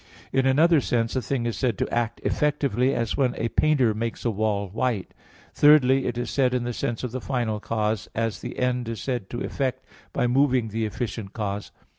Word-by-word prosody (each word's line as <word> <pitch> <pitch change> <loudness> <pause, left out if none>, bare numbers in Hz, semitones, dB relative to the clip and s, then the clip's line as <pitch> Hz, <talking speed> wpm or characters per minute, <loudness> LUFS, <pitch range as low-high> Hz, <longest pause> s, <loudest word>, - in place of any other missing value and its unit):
In 135 0 +3
another 155 +3 +5
sense 115 -1 0
a 130 - +1
thing 125 -2 -2
is 115 - -1
said 120 -7 0
to - - 0
act 120 -1 -1
effectively, 140 -3 +1
as 115 -2 -1
when 130 -3 +1
a 115 - -1
painter 135 -7 +3
makes 115 +3 -4
a 115 - +2
wall 105 -1 0
white. 110 0 -2 0.4
Thirdly, 135 -3 +5
it 120 - -2
is 120 0 -3
said 130 -2 +2
in 125 - 0
the 120 0 -3
sense 115 +1 -3
of 125 - -3
the 130 +1 -4
final 120 -5 -1
cause, 110 -1 -2
as 115 -6 -1
the - - -7
end 125 -2 0
is 115 - -4
said 125 -7 -3
to 120 - -5
effect 130 -1 -2 0.3
by - - 0
moving 125 -2 +2
the 110 +1 -1
efficient 110 -2 -5
cause. 105 -2 -4
120 Hz, 205 wpm, -25 LUFS, 110-130 Hz, 0.4 s, another